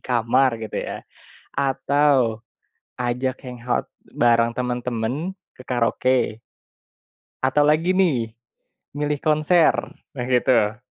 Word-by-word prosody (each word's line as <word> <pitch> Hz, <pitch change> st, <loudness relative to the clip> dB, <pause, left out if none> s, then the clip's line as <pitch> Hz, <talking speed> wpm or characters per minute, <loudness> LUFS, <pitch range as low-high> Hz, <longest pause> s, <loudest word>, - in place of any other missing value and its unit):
kamar 125 Hz, +1 st, +2 dB
gitu, 110 Hz, -1 st, -6 dB
ya, -, -, -5 dB, 0.6 s
atau 135 Hz, -4 st, +2 dB, 0.6 s
ajak 125 Hz, +1 st, -1 dB
hangout 125 Hz, -1 st, -3 dB, 0.3 s
bareng 115 Hz, -1 st, +3 dB
temen-temen 125 Hz, +6 st, -2 dB, 0.2 s
ke 125 Hz, -, -13 dB
karaoke? 125 Hz, -1 st, +1 dB, 1.1 s
Atau 145 Hz, +3 st, +3 dB
lagi, 160 Hz, +5 st, +3 dB
nih, 130 Hz, -12 st, +1 dB, 0.6 s
milih 150 Hz, 0 st, -1 dB
konser? 155 Hz, +2 st, +4 dB, 0.4 s
Nah 130 Hz, -5 st, -4 dB
gitu. 120 Hz, -3 st, +2 dB
125 Hz, 95 wpm, -22 LUFS, 120-145 Hz, 1.1 s, konser